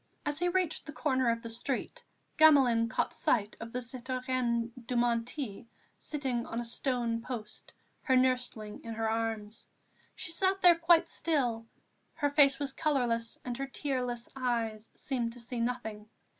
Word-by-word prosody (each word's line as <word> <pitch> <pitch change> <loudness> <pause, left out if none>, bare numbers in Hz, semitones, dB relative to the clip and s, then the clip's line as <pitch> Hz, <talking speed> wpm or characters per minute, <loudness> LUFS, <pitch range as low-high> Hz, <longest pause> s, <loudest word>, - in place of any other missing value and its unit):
As 295 +1 0
he 355 +1 +2
reached 350 -4 0
the 300 - -7
corner 260 -5 +1
of 230 0 0
the 230 - -5
street, 270 - -3 0.4
Gamelin 260 -7 +6
caught 250 - -1
sight 210 -3 +1
of 230 0 -7
the 250 +1 -3
citoyenne 250 -1 -1 0.2
Dumonteil, 240 -1 -1 0.3
seated 265 -5 -2
on 230 - -3
a 240 - -3
stone 235 -1 -1
post, 230 -3 -7 0.3
her 260 -3 +2
nursling 250 -4 0
in 230 -1 -6
her 225 0 -1
arms. 220 -1 -3 0.5
She 365 - -4
sat 380 +3 +1
there 355 -1 +9
quite 335 0 +4
still; 250 -10 0 0.5
her 290 -1 0
face 280 -2 +5
was 280 -1 -2
colourless 240 -7 0
and 245 -1 -3
her 275 - -2
tearless 250 -4 -2
eyes 230 -4 -2
seemed 240 -4 -2
to 245 - -10
see 235 +1 -4
nothing. 220 -3 -3
245 Hz, 155 wpm, -31 LUFS, 230-280 Hz, 0.5 s, there